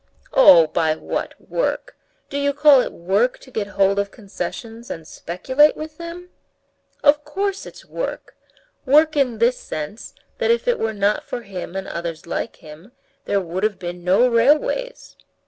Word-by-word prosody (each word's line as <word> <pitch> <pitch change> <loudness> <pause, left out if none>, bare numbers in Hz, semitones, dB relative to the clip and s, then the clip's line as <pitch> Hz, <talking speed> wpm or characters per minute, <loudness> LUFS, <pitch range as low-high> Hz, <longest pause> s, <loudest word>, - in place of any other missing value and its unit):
"Oh, 180 - +8
by 155 0 0
what - - -4
work? - - -3 0.4
Do 285 - -2
you 285 0 +1
call 290 -3 +6
it - - -4
work 195 +8 0
to 260 - -17
get 215 -4 -2
hold 195 0 +3
of 200 0 -1
concessions 225 +3 -7
and 160 -1 -7
speculate 260 - +1
with 310 0 -8
them?" 345 +1 -8 0.7
"Of 295 0 +5
course 390 +6 -3
it's - - -13
work. - - -5 0.5
Work 305 +3 +4
in 255 -5 +1
this 235 +3 +2
sense, 155 +9 -7 0.2
that 480 -2 +1
if 470 +1 +2
it 485 - +2
were 220 0 -1
not 200 +1 +1
for 245 - -6
him 190 -3 -7
and 195 0 -4
others 170 -1 -5
like 170 - -4
him, 160 +9 -14 0.3
there 200 - +1
would 180 +1 -4
have 210 -2 0
been 175 -1 -7
no 190 +8 +4
railways." 295 - +1
230 Hz, 165 wpm, -21 LUFS, 185-295 Hz, 0.7 s, Oh